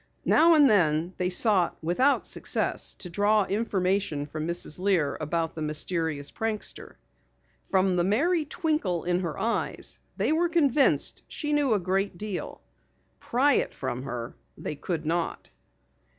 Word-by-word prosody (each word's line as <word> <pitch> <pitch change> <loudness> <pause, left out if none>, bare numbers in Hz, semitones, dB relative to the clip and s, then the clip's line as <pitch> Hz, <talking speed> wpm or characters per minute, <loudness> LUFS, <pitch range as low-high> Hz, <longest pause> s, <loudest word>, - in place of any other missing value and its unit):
Now 330 +1 +5
and 295 -2 +6
then 170 -5 +2
they 180 0 0
sought 190 -2 +2
without 255 - +2
success - - -1
to - - -7
draw 205 +2 +2
information 190 -7 -1
from 155 +2 -5
Mrs. 170 -2 -1
Lear 185 -6 +1
about 165 +1 -1
the 160 - -7
mysterious 155 -1 -1
prankster. 220 -1 -4 0.7
From 190 -1 +2
the 175 - +2
merry 305 - +2
twinkle 295 - -1
in 175 0 0
her 170 -4 -4
eyes 230 +1 -2 0.2
they - - +1
were 340 +2 +2
convinced 290 -5 +2
she 295 -1 -3
knew 285 -6 +2
a - - +1
great 190 +1 -1
deal. 205 -1 -6 0.6
Pry 275 +4 +2
it - - 0
from 130 -2 -4
her 125 -3 -5 0.2
they 150 - -5
could 160 +2 -4
not. 170 +2 -2
185 Hz, 145 wpm, -27 LUFS, 165-230 Hz, 0.7 s, and